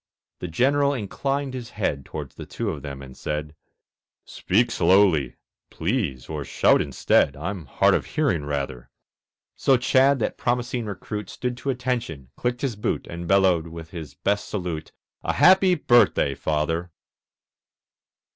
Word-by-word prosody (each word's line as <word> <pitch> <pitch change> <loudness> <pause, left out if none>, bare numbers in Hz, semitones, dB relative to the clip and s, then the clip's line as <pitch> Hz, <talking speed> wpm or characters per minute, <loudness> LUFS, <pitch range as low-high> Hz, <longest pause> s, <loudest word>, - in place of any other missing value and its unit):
The - - -4
General 140 - +2
inclined 135 +5 -2
his 125 -2 -6
head 70 -9 -1
Towards - - -7
the - - -9
two 115 -3 -3
of 75 -5 -6
them 70 -1 -7
and 65 -1 -11
said, 75 0 -4 0.7
"Speak 115 +6 +1
slowly, 85 -7 +3 0.3
please, 80 - -2
or 75 -2 -4
shout - - +3
instead; 70 - +2
I'm 85 0 -5
hard - - +3
of - - 0
hearing, 75 - 0
rather." 70 -4 -4 0.7
So 135 - +3
Chadd, 135 +2 +4
that 110 - -2
promising 120 -1 -1
recruit, 105 0 -5
Stood 125 -1 -3
to 140 - -4
attention, 120 - -3
clicked 125 0 -2
his 130 -5 -1
boot, 105 - -2
And 85 0 -7
bellowed, 95 -3 +3
with 80 0 -9
his 80 -6 -8
best 100 +6 -1
salute, 90 -6 -4 0.3
"A - - 0
happy 190 0 +6
birthday, 120 - +3
Father!" 80 +4 -1
95 Hz, 145 wpm, -24 LUFS, 75-125 Hz, 0.7 s, happy